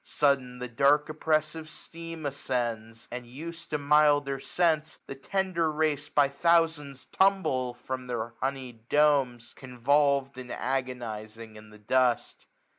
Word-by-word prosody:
Sudden 135 Hz, -4 st, +1 dB
the 125 Hz, 0 st, -5 dB
dark 140 Hz, +5 st, +3 dB
oppressivie 155 Hz, 0 st, -1 dB
steam 165 Hz, 0 st, -8 dB
ascends; 120 Hz, -5 st, -3 dB
And, 125 Hz, 0 st, -5 dB
us'd 165 Hz, +6 st, -8 dB
to 150 Hz, -, 0 dB
milder 145 Hz, -1 st, +3 dB
scents, 160 Hz, 0 st, 0 dB
the -, -, -6 dB
tender 170 Hz, +2 st, -1 dB
race, 150 Hz, -1 st, -1 dB
3y 140 Hz, -1 st, +3 dB
thousands, 150 Hz, -3 st, +1 dB
tumble 135 Hz, -11 st, +1 dB
from 130 Hz, +1 st, -6 dB
their 120 Hz, -1 st, -3 dB
honeyed 130 Hz, -4 st, -4 dB
(domes. 135 Hz, -5 st, +2 dB
Convolved, 135 Hz, +1 st, +1 dB
and 125 Hz, -1 st, -8 dB
agonizing 115 Hz, -4 st, -4 dB
in 110 Hz, 0 st, -13 dB
the 105 Hz, -, -15 dB
dust. 125 Hz, +3 st, 0 dB
140 Hz, 125 wpm, -28 LUFS, 125-150 Hz, -, dark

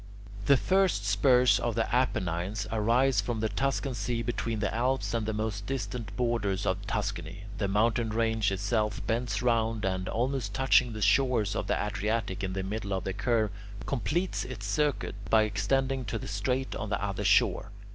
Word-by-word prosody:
The 140 Hz, -, +6 dB
first 185 Hz, -, +2 dB
spurs 125 Hz, +5 st, +4 dB
of 120 Hz, -2 st, -1 dB
the 115 Hz, -1 st, +1 dB
Apennines 95 Hz, -5 st, 0 dB
arise 115 Hz, +2 st, +3 dB
from 110 Hz, +2 st, -3 dB
the 110 Hz, 0 st, 0 dB
Tuscan 135 Hz, +1 st, -1 dB
sea 115 Hz, +1 st, -2 dB
between 115 Hz, -1 st, -2 dB
the 105 Hz, -1 st, -1 dB
Alps 125 Hz, +3 st, 0 dB
and 115 Hz, -2 st, -1 dB
the -, -, 0 dB
most 105 Hz, -2 st, -3 dB
distant 125 Hz, -4 st, -4 dB
borders 115 Hz, -6 st, 0 dB
of 95 Hz, +2 st, -1 dB
Tuscany. 100 Hz, -1 st, -3 dB, 0.2 s
The 100 Hz, -, +1 dB
mountain 110 Hz, +3 st, +1 dB
range 110 Hz, -2 st, +1 dB
itself 105 Hz, +2 st, -1 dB
bends 115 Hz, -1 st, -1 dB
round 115 Hz, -3 st, +1 dB
and, 95 Hz, -1 st, -1 dB
almost 125 Hz, -2 st, -1 dB
touching 130 Hz, -2 st, +3 dB
the 110 Hz, -1 st, -3 dB
shores 120 Hz, -7 st, +3 dB
of -, -, -2 dB
the -, -, +1 dB
Adriatic 105 Hz, -1 st, -2 dB
in 95 Hz, -1 st, -2 dB
the 95 Hz, 0 st, -2 dB
middle 100 Hz, 0 st, -3 dB
of 95 Hz, -, -2 dB
the 95 Hz, -, -3 dB
curve, 110 Hz, 0 st, +1 dB, 0.3 s
completes 170 Hz, +7 st, -1 dB
its 120 Hz, -6 st, -7 dB
circuit 145 Hz, +8 st, 0 dB, 0.2 s
by 110 Hz, -1 st, +5 dB
extending 130 Hz, +6 st, 0 dB
to 110 Hz, +1 st, -3 dB
the -, -, -7 dB
strait 125 Hz, +6 st, -1 dB
on 110 Hz, -, -4 dB
the 100 Hz, -, -1 dB
other 100 Hz, -2 st, -3 dB
shore. -, -, +3 dB
110 Hz, 175 wpm, -29 LUFS, 100-125 Hz, 0.3 s, The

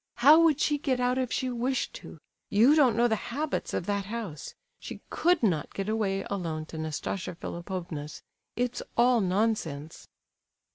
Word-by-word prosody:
"How 290 Hz, +7 st, +7 dB
would 315 Hz, -4 st, +4 dB
she 295 Hz, -1 st, +1 dB
get 265 Hz, -4 st, 0 dB
out 250 Hz, +1 st, +1 dB
if 255 Hz, -2 st, -2 dB
she 255 Hz, -1 st, -1 dB
wished 250 Hz, -, -1 dB
to? -, -, -11 dB, 0.3 s
You 230 Hz, +8 st, +5 dB
don't 260 Hz, -8 st, +4 dB
know 240 Hz, +1 st, +4 dB
the 220 Hz, -, +1 dB
habits 295 Hz, +5 st, -2 dB
of -, -, -2 dB
that 200 Hz, -1 st, -1 dB
house—she 220 Hz, -, -8 dB
could 350 Hz, -4 st, +2 dB
not 170 Hz, -9 st, 0 dB
get 195 Hz, 0 st, -3 dB
away 200 Hz, -3 st, -1 dB
alone 165 Hz, -6 st, -3 dB
to 160 Hz, -, -5 dB
Nastasia 160 Hz, +4 st, -4 dB
Philipovna's! 170 Hz, -4 st, -6 dB, 0.3 s
It's 245 Hz, 0 st, -1 dB, 0.2 s
all 240 Hz, 0 st, +4 dB
nonsense!" 180 Hz, -6 st, -1 dB
225 Hz, 155 wpm, -28 LUFS, 180-255 Hz, 0.3 s, How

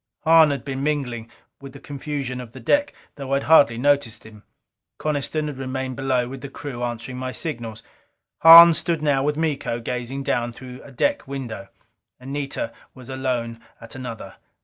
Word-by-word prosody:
Hahn 160 Hz, -1 st, +6 dB
had 140 Hz, -1 st, -3 dB
been 135 Hz, -1 st, -4 dB
mingling 130 Hz, -6 st, -2 dB, 0.3 s
with 135 Hz, -1 st, -10 dB
the 140 Hz, -, -11 dB
confusion 140 Hz, -3 st, -5 dB
of 115 Hz, -2 st, -12 dB
the 130 Hz, -, -10 dB
deck 290 Hz, -, +1 dB, 0.3 s
though 135 Hz, -1 st, -4 dB
I -, -, +4 dB
had 140 Hz, -, -1 dB
hardly 140 Hz, -8 st, +5 dB
noticed 130 Hz, -4 st, 0 dB
him. 110 Hz, -1 st, -14 dB, 0.6 s
Coniston 155 Hz, +1 st, -2 dB
had 145 Hz, -3 st, -5 dB
remained 130 Hz, 0 st, -4 dB
below 130 Hz, -2 st, 0 dB
with 130 Hz, +1 st, -8 dB
the 140 Hz, -, -7 dB
crew 135 Hz, -3 st, -7 dB
answering 120 Hz, +1 st, -4 dB
my 130 Hz, 0 st, -4 dB
signals. 115 Hz, -8 st, -5 dB, 0.6 s
Hahn 165 Hz, +1 st, +10 dB
stood 160 Hz, -1 st, -1 dB
now 140 Hz, -3 st, +2 dB
with 150 Hz, +2 st, -1 dB
Miko, 150 Hz, -7 st, -2 dB
gazing 125 Hz, +3 st, -4 dB
down 120 Hz, -2 st, -1 dB
through 125 Hz, +1 st, -11 dB
a 140 Hz, -, -14 dB
deck 285 Hz, -, -1 dB
window. 130 Hz, -7 st, -6 dB, 0.5 s
Anita 135 Hz, -3 st, -4 dB, 0.2 s
was 130 Hz, -1 st, -13 dB
alone 125 Hz, -3 st, -3 dB, 0.2 s
at 115 Hz, -, -11 dB
another. 125 Hz, -4 st, -8 dB
135 Hz, 170 wpm, -22 LUFS, 120-145 Hz, 0.6 s, Hahn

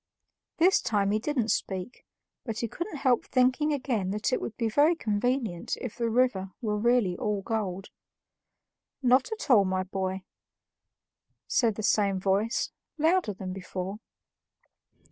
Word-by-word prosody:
This 365 Hz, +4 st, +4 dB
time 200 Hz, -3 st, +1 dB
he 215 Hz, -, +2 dB
didn't 245 Hz, -2 st, -1 dB
speak, 190 Hz, +3 st, -3 dB, 0.4 s
but 225 Hz, -3 st, -4 dB
he 235 Hz, -, -1 dB
couldn't 340 Hz, -, -5 dB
help 255 Hz, -3 st, +2 dB
thinking 255 Hz, +4 st, +2 dB
again 250 Hz, -9 st, -1 dB
that 210 Hz, +6 st, -1 dB
it -, -, +1 dB
would 225 Hz, -, -5 dB
be 230 Hz, -, 0 dB
very 290 Hz, +9 st, +4 dB
convenient 225 Hz, -, -1 dB
if 250 Hz, -5 st, -6 dB
the 235 Hz, -1 st, -1 dB
river 225 Hz, -5 st, +1 dB
were 215 Hz, -4 st, -1 dB
really 235 Hz, -5 st, +2 dB
all 205 Hz, 0 st, -2 dB
gold. 195 Hz, -3 st, -3 dB, 1.1 s
"Not 255 Hz, -, +4 dB
at 435 Hz, -10 st, -3 dB
all, 210 Hz, -5 st, +7 dB
my 185 Hz, 0 st, 0 dB
boy," 190 Hz, 0 st, -3 dB, 1.2 s
said 230 Hz, -5 st, +2 dB
the 215 Hz, -, -5 dB
same 200 Hz, -3 st, +2 dB
voice, 200 Hz, +5 st, 0 dB, 0.3 s
louder 320 Hz, -, +2 dB
than 185 Hz, -1 st, -5 dB
before. 190 Hz, +1 st, -5 dB
220 Hz, 145 wpm, -28 LUFS, 195-255 Hz, 1.2 s, all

